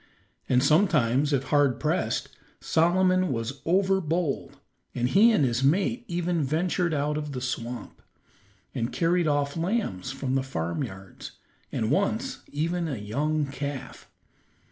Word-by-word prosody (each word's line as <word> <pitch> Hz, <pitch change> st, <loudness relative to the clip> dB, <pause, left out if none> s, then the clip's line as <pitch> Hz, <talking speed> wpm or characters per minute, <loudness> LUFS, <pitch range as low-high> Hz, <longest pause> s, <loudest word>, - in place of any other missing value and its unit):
And 125 Hz, 0 st, +4 dB
sometimes, 150 Hz, -, +3 dB
if 135 Hz, -2 st, +1 dB
hard 145 Hz, -4 st, +3 dB
pressed, -, -, -1 dB, 0.3 s
Solomon 185 Hz, +2 st, +2 dB
was 120 Hz, +3 st, -4 dB
overbold, 175 Hz, -6 st, +1 dB, 0.4 s
and 125 Hz, -1 st, +1 dB
he 215 Hz, -, +6 dB
and 155 Hz, -11 st, +3 dB
his 120 Hz, +1 st, 0 dB
mate 200 Hz, -, +2 dB
even 175 Hz, -1 st, -1 dB
ventured 170 Hz, +4 st, 0 dB
out 150 Hz, 0 st, 0 dB
of 150 Hz, -1 st, -4 dB
the 130 Hz, -, -3 dB
swamp, 125 Hz, -1 st, -5 dB, 0.7 s
and 115 Hz, -, -2 dB
carried 170 Hz, 0 st, +1 dB
off 145 Hz, -1 st, 0 dB
lambs 165 Hz, -, -1 dB
from 135 Hz, -1 st, -3 dB
the 135 Hz, -, +2 dB
farmyards, 95 Hz, -, -5 dB, 0.4 s
and 110 Hz, +2 st, -1 dB
once 220 Hz, -, 0 dB
even 170 Hz, +3 st, -1 dB
a 140 Hz, -6 st, -3 dB
young 145 Hz, +9 st, -1 dB
calf. 140 Hz, -1 st, -6 dB
150 Hz, 130 wpm, -27 LUFS, 130-175 Hz, 0.7 s, he